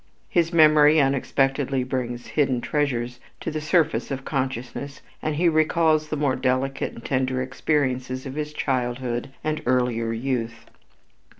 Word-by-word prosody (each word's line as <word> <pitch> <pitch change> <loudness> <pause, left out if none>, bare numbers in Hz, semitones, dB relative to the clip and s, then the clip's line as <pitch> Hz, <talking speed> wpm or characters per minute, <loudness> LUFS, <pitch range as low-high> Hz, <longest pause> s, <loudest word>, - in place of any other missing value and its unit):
His 170 -2 +2
memory 155 -2 +6
unexpectedly 135 -1 +1
brings 125 -2 -3
hidden 135 -5 +1
treasures 125 -3 -1 0.2
to - - -4
the 155 0 -3
surface 160 0 +1
of 135 -1 -4
consciousness 130 0 -4 0.2
and 155 -1 -1
he 175 +3 +2
recalls 155 -1 +3
the 155 - -2
more 140 -3 +1
delicate 130 +1 -1
and 115 - -12
tender 130 -1 0
experiences 130 -1 -1
of 130 - -5
his 150 +1 -3
childhood 125 -2 -2
and 155 0 -1
earlier 120 -2 +1
youth. 115 -1 -3
135 Hz, 135 wpm, -24 LUFS, 125-150 Hz, 0.2 s, memory